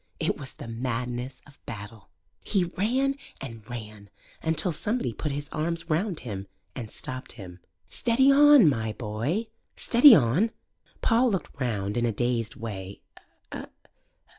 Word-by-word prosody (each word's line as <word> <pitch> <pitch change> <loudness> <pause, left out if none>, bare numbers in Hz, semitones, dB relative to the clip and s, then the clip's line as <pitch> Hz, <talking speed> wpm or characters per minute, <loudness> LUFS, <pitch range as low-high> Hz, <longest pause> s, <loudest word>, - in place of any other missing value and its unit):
It - - +1
was 140 -3 -8
the - - -9
madness 125 +2 -4
of 145 - -20
battle. 105 -1 -8 0.3
He 195 -4 +1
ran 250 +10 0 0.2
and 115 -4 -7
ran, 105 -4 -8 0.3
until 165 +3 +1
somebody 205 - -1
put 150 +7 -3
his 145 +1 -4
arms 165 +1 -3
round 175 +2 0
him 100 -5 -6 0.3
and 115 -4 -6
stopped 130 +3 -6
him. 95 -5 -10 0.3
"Steady 260 +3 +3
on, 290 - +8
my 110 -6 +1
boy 120 - -2 0.3
steady 245 +1 +8
on!" 150 - +3 0.5
Paul 240 +2 +4
looked 190 -8 -4
round 105 -3 -1
in 120 0 +2
a - - +1
dazed 115 +1 -1
way. 100 -3 -7
130 Hz, 140 wpm, -27 LUFS, 115-190 Hz, 0.5 s, on